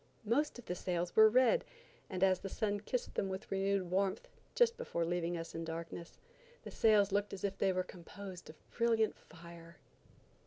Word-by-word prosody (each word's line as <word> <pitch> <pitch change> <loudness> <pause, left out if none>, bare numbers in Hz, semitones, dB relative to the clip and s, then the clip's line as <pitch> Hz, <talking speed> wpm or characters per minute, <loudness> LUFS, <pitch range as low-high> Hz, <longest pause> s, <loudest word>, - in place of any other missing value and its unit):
Most 275 +8 +1
of 245 - -11
the - - -2
sails 175 -1 -2
were 220 0 +8
red, 255 - +4 0.5
and 185 -1 -1
as 190 -1 +4
the 195 - -6
sun 205 +1 -1
kissed 245 +4 -3
them 195 - -1
with 190 +2 -6
renewed 195 -2 0
warmth, 195 0 0 0.3
just 470 -1 +4
before 170 - -2
leaving 175 0 -1
us 165 0 -6
in 165 - -4
darkness, 165 +1 -6 0.5
the - - -8
sails 210 -3 +4
looked 205 +1 0
as 195 - -7
if 195 -1 -2
they 195 - +3
were 185 0 0
composed 185 +1 -10
of 155 - -10 0.2
brilliant 230 -2 +2
fire. 170 0 -13
190 Hz, 185 wpm, -35 LUFS, 175-210 Hz, 0.5 s, were